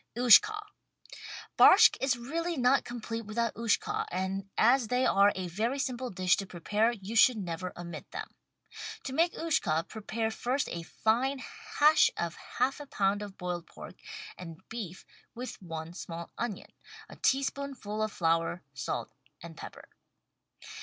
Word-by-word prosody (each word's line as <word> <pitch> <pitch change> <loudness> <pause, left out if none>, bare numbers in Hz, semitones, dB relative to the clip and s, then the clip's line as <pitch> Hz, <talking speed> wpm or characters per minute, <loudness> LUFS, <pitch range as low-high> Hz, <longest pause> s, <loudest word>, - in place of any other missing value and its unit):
XJshka 420 - +7 1.0
Barshck 445 +4 +8
is 265 -2 +2
really 330 +7 -3
not 255 +2 +3
complete 230 -1 -5
without 230 +1 -1
"Ushka," 230 -2 0
and 190 +2 -3
as 240 +1 +4
they 250 +3 +1
are 200 +1 +5
a 185 -1 -3
very 220 +10 -1
simple 255 -2 -2
dish 185 -1 +2
to 195 - -4
prepare 210 +7 0
you 215 -1 -7
should 240 +1 +6
never 180 -2 -4
omit 170 -3 -8
them. - - -7 0.7
To 260 - -5
make 335 +5 +2
"Ushka" 170 - 0
prepare 220 +1 -3
first 255 +5 -1
a 170 - -4
fine 235 +10 0 0.4
hash 300 +1 +6
of 170 -1 -2 0.2
half 270 +3 +1
a 290 - -9
pound 200 -3 0
of 205 -2 -8
boiled 175 -1 -4
pork - - -11 0.4
and 165 -3 -9
beef 205 -6 -7 0.3
with 250 -2 -7
one 165 -2 -6
small 170 -2 -7
onion, 230 -4 -5 0.4
a - - -12
tablespoonful 270 -5 -1
of 215 -1 0
flour, 165 0 0
salt 140 +1 -4 0.3
and 170 -1 -9
pepper. - - -10
220 Hz, 145 wpm, -30 LUFS, 180-255 Hz, 1.0 s, Barshck